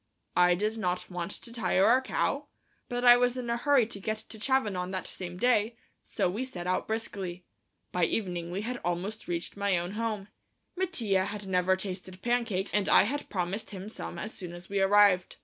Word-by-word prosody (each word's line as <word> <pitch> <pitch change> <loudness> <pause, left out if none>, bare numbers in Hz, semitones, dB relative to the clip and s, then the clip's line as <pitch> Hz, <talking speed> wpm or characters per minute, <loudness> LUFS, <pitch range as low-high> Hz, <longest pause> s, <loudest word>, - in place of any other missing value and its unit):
I 180 0 +5
did 215 +4 -1
not 180 -2 -2
want 180 0 -3
to 230 +3 -5
tire 210 -5 +2
our 250 +3 +5
cow, 280 +2 -1 0.4
but 245 0 -1
I 245 0 +10
was 245 0 +2
in 240 -2 -3
a - - +2
hurry 275 -1 +4
to 215 -2 -7
get 215 +2 -2
to 220 0 -8
Chavanon 210 -8 0
that 190 -1 -4
same 180 -1 -7
day, 230 0 +2 0.3
so 195 -4 -1
we 205 +8 -2
set 185 -10 -6
out 185 0 0
briskly. 195 -5 -4 0.5
By 180 -1 +2
evening 175 -4 -2
we 185 +3 -3
had 240 +3 -4
almost 180 +6 -3
reached 170 -1 -3
my 200 -2 +1
old 175 +1 -3
home. 215 -2 -3 0.5
Mattia 235 - +1
had 205 0 -4
never 185 0 +2
tasted 185 -1 -6
pancakes, 235 -6 0
and 205 -2 +2
I - - +8
had 285 +8 -3
promised 185 +3 -2
him 195 0 -7
some - - -6
as 215 - -4
soon 180 -3 -6
as 175 +1 -9
we 200 0 0
arrived. 195 -2 +5
200 Hz, 200 wpm, -29 LUFS, 180-230 Hz, 0.5 s, I